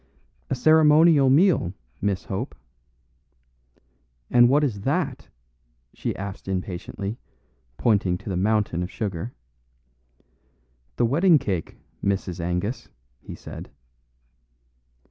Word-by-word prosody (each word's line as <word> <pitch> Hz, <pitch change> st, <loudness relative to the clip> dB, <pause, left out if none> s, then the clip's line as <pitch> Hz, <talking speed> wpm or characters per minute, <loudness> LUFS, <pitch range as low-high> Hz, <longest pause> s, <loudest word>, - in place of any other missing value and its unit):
"A -, -, 0 dB
ceremonial 155 Hz, 0 st, +5 dB
meal, 145 Hz, -, +3 dB, 0.3 s
Miss 100 Hz, -2 st, -1 dB
Hope." -, -, -4 dB, 1.8 s
"And 120 Hz, 0 st, +6 dB
what 145 Hz, +3 st, +4 dB
is 110 Hz, -9 st, -1 dB
that?" -, -, -2 dB, 0.7 s
she -, -, -3 dB
asked 100 Hz, 0 st, -7 dB
impatiently, 95 Hz, +3 st, -4 dB, 0.6 s
pointing 100 Hz, -6 st, +2 dB
to 100 Hz, -, -9 dB
the 95 Hz, -, -2 dB
mountain 100 Hz, -2 st, +1 dB
of 90 Hz, -, -3 dB
sugar. 95 Hz, +3 st, -4 dB, 1.6 s
"The 120 Hz, -, +2 dB
wedding 165 Hz, +7 st, +4 dB
cake, 95 Hz, -, -3 dB, 0.3 s
Mrs. 95 Hz, -2 st, -1 dB
Angus," 90 Hz, +8 st, -3 dB, 0.3 s
he -, -, -9 dB
said. -, -, -9 dB
105 Hz, 100 wpm, -24 LUFS, 95-135 Hz, 1.8 s, And